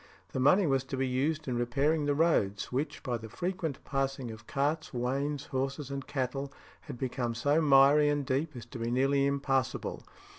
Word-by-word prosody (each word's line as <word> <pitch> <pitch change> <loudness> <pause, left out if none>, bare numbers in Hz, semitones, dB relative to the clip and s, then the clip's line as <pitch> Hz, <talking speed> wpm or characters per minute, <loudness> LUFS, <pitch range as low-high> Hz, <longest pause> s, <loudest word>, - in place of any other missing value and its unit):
The - - -3
money 185 +9 +5
was 135 -3 +2
to 135 - -4
be 135 0 0
used 150 +5 -1
in 120 -2 -1
repairing 145 +6 +1
the 145 0 +1
roads, 105 -11 +1
which, 135 +5 -2
by 125 -3 -1
the 110 0 -9
frequent 175 - -3
passing 135 -3 -2
of 110 -1 -11
carts, 150 +3 -1
wains, 135 +4 -1
horses, 135 +1 -3
and 140 -1 -5
cattle, 135 0 -2 0.3
had 140 -5 -8
become 120 -2 -2
so 145 +6 +2
miry 145 0 +6
and 145 -1 0
deep 140 +4 -1
as 120 -2 -8
to 125 - -6
be 115 0 -2
nearly 135 +3 +2
impassable. 135 -2 -1
135 Hz, 185 wpm, -30 LUFS, 130-145 Hz, 0.3 s, miry